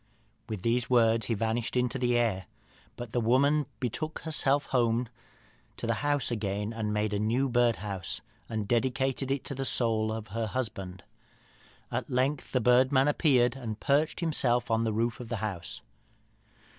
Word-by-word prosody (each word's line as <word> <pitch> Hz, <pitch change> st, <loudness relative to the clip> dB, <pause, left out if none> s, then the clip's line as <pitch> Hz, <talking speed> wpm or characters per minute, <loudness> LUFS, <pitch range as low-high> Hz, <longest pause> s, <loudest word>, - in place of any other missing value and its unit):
"With 105 Hz, -4 st, -5 dB
these 115 Hz, 0 st, +1 dB
words 115 Hz, -3 st, +3 dB
he 115 Hz, -, 0 dB
vanished 115 Hz, +3 st, -1 dB
into 125 Hz, +2 st, 0 dB
the 120 Hz, -1 st, +2 dB
air. 105 Hz, -7 st, 0 dB, 0.5 s
But 120 Hz, -2 st, -7 dB
the 120 Hz, -, 0 dB
woman 140 Hz, +6 st, +3 dB
betook 155 Hz, +6 st, -3 dB
herself 145 Hz, -3 st, +1 dB
home 120 Hz, -1 st, +2 dB, 0.7 s
to -, -, -5 dB
the -, -, +1 dB
house 145 Hz, -3 st, +1 dB
again, 105 Hz, -1 st, -2 dB, 0.2 s
made 105 Hz, 0 st, 0 dB
a 100 Hz, -, 0 dB
new 120 Hz, +6 st, +1 dB
birdhouse, 110 Hz, -6 st, 0 dB, 0.3 s
and 110 Hz, -2 st, -3 dB
dedicated 130 Hz, +3 st, 0 dB
it 135 Hz, -1 st, -1 dB
to -, -, -4 dB
the 135 Hz, 0 st, -3 dB
soul 110 Hz, -4 st, +1 dB
of 110 Hz, -2 st, -5 dB
her 115 Hz, +2 st, -2 dB
husband. 100 Hz, -6 st, -4 dB, 0.9 s
At -, -, -3 dB
length 130 Hz, +3 st, 0 dB
the 130 Hz, -, +2 dB
bird 125 Hz, +3 st, +4 dB
man 135 Hz, 0 st, +4 dB
appeared 130 Hz, -5 st, +3 dB
and 115 Hz, -5 st, -5 dB
perched 150 Hz, +5 st, +1 dB
himself 125 Hz, -8 st, +1 dB
on 115 Hz, 0 st, +2 dB
the 110 Hz, -, 0 dB
roof 115 Hz, +2 st, -1 dB
of 120 Hz, -2 st, -8 dB
the 120 Hz, -, -1 dB
house." 100 Hz, -4 st, -5 dB
120 Hz, 165 wpm, -29 LUFS, 110-130 Hz, 0.9 s, bird